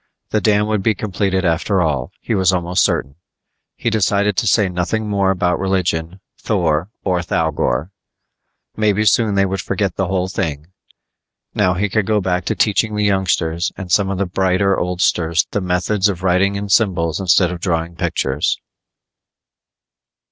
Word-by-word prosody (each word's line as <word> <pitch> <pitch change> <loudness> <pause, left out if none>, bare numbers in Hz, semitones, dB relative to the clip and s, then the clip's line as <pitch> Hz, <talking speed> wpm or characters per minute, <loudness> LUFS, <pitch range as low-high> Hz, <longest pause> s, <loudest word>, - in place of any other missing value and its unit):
The 110 - +1
dam 105 -1 +2
would 105 -1 -1
be 110 +2 +1
completed 95 -2 -1
after 90 +4 +1
all, 75 -7 -1
he - - -3
was 95 -4 +3
almost 90 0 0
certain. 70 +2 -1 0.6
He 115 - -2
decided 105 -1 +1
to 115 - +1
say 100 +1 +3
nothing 90 +5 -2
more 100 -2 +1
about 90 -2 0
religion, 90 -2 -1 0.2
Thor 85 -4 0
or 90 -2 0
Thougor. 80 -2 -1 0.8
Maybe 105 0 +1
soon 105 0 +3
they 100 0 +3
would 95 -1 -2
forget 100 -3 -2
the 95 - 0
whole 95 0 -1
thing. 80 -4 -4 0.8
Now 90 0 +2
he 100 +3 0
could 105 0 -1
go 110 -1 +2
back 90 -2 -1
to - - -1
teaching 110 0 +1
the 105 - 0
youngsters 90 -4 0
and 95 -3 -7
some 100 +1 +3
of 95 - -2
the 100 - 0
brighter 95 +1 +1
oldsters 90 -2 +1
the 105 - -1
methods 95 +3 +1
of 90 -2 -4
writing 95 +2 +2
in 100 0 -4
symbols 90 -6 +1
instead 90 -1 +3
of 90 -1 -6
drawing 85 -2 -2
pictures. 70 -2 -1
95 Hz, 160 wpm, -18 LUFS, 85-100 Hz, 0.8 s, was